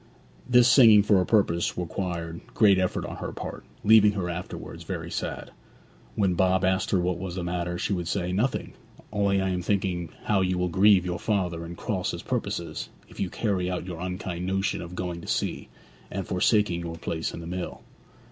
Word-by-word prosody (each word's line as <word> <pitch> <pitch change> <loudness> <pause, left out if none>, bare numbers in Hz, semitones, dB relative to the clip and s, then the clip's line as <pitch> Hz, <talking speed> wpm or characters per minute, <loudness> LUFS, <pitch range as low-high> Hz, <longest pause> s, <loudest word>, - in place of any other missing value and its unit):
This 125 -1 +6
singing 115 -5 +8
for 100 -2 +4
a 90 - -2
purpose 90 -6 +2
required 85 -1 -4
great 100 -4 +5
effort 90 -1 -1
on - - -6
her - - -5
part, - - -7 0.2
leaving 105 -1 +6
her 90 -3 -2
afterwards 85 +1 -7
very - - -5
sad. - - -4 0.6
When 95 -3 +2
Bob 95 +1 +2
asked 95 0 +1
her 95 - +2
what 90 0 -1
was 90 -1 -5
the 90 - -3
matter, 90 0 -2
she 100 - -1
would 90 -3 -2
say, 90 0 -1
'Nothing; 110 +8 -1 0.4
only 100 -1 +2
I 95 0 0
am 90 -1 -1
thinking 90 -3 -1
how 100 -2 +2
you 90 -1 +1
will 90 0 0
grieve 95 +1 +5
your 90 -1 -2
father, 90 -6 -1
and 85 +1 -8
cross - - -2
his - - -6
purposes, 85 -2 -3 0.2
if - - -14
you 95 - -1
carry 95 -4 -1
out 90 -1 -3
your 90 -3 -6
unkind 90 -1 -4
notion 95 +1 0
of 85 +1 -8
going 90 -2 -4
to - - -11
sea, - - -2 0.4
and 95 -2 -4
forsaking 95 -1 +2
your 85 -1 -5
place 80 0 -3
in - - -7
the 85 - -8
mill.' 90 +1 -5
90 Hz, 195 wpm, -26 LUFS, 85-100 Hz, 0.6 s, singing